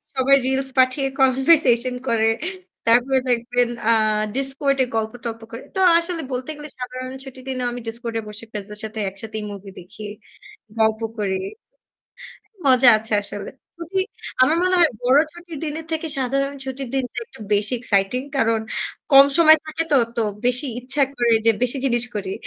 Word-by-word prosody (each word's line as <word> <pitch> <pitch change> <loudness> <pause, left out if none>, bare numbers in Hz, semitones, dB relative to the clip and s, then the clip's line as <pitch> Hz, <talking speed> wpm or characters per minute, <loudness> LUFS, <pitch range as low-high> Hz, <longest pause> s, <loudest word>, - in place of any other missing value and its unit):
সবাই 265 +1 +5
reels 265 0 -1
পাঠিয়ে 260 +2 +3
conversation 260 -2 +4
করে। 225 -1 +2 0.6
তারপরে 250 +3 +4
দেখবেন, 245 0 +1 0.2
আ - - +6 0.4
Discord 275 +1 -1
এ - - 0
গল্প-টল্প 230 +1 -3
করে। 230 - -8
তো 380 - -1 0.2
আসলে 335 -1 -2
বলতে 250 +3 -3
গেলে 295 +1 -9
সাধারণ 255 +1 -5
ছুটির 260 -1 -11
দিনেও 255 -2 -2
আমি 245 0 -6
Discord 230 0 -5
এ - - -4
বসে 210 +2 -9
friends 210 -1 -6
এর 210 - -11
সাথে 220 0 -5
একসাথেই 215 +2 -7
movie 195 -1 -9
দেখি, 200 +4 -12 0.8
গল্প 220 0 +2 0.2
করি। 195 -2 -1 1.3
মজা 255 -1 +6
আছে 220 0 -10
আসলে। 200 0 -7 0.3
খুবই 345 +3 -2 0.4
আমার 310 +5 +4
মনে 370 0 +2
হয় 330 -4 +5
বড় 255 +3 +5
ছুটির 345 -2 -9
দিনের 315 +1 -5
থেকে 320 0 -2
সাধারণ 275 +2 0
ছুটির 265 0 -5
দিনটা 265 -2 -2
একটু 335 - -17
বেশি 205 +3 -1
exciting। 205 +4 0
কারণ 225 -3 +2 0.5
কম 275 0 +10
সময় 315 -1 +8
থাকে 310 +1 -2
তো, - - +6 0.2
তো 230 - +2 0.2
বেশি 250 +4 0
ইচ্ছা 270 +3 -1
করে 240 -1 +2
যে 225 - +7
বেশি 250 +2 0
জিনিস 240 -1 0
করি। 190 -2 -3
250 Hz, 165 wpm, -22 LUFS, 225-275 Hz, 1.3 s, কম